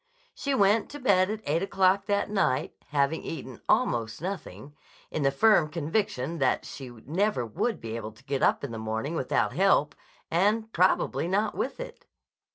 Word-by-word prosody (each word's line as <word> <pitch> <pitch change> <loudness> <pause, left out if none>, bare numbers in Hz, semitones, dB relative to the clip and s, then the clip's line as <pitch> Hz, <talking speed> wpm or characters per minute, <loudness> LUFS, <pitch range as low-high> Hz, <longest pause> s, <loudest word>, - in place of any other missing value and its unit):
She 280 -1 -2
went 205 -1 +3
to 290 - -8
bed 195 -7 +3
at 215 +1 -3
eight 155 +4 +1
o'clock 195 0 +2
that 205 -1 +1
night, 190 -11 +1
having 140 +1 +1
eaten 130 -6 -7
almost 120 - +1
nothing, 150 - -6 0.4
in 155 - -2
the 135 - +4
firm 155 +2 +4
conviction 165 - -2
that 130 -2 +1
she 135 -3 -8
never 145 - -1
would 180 - -2
be 115 0 -6
able 110 -1 -6
to 130 - -21
get 135 -1 -2
up - - +3
in 140 - -4
the 115 - -5
morning 110 +7 -3
without 135 -6 0
help, 185 -5 +3 0.4
and 215 +6 +1
probably 180 -1 +2
not 205 +3 +1
with 265 - -3
it! - - -9
165 Hz, 170 wpm, -27 LUFS, 130-205 Hz, 0.4 s, the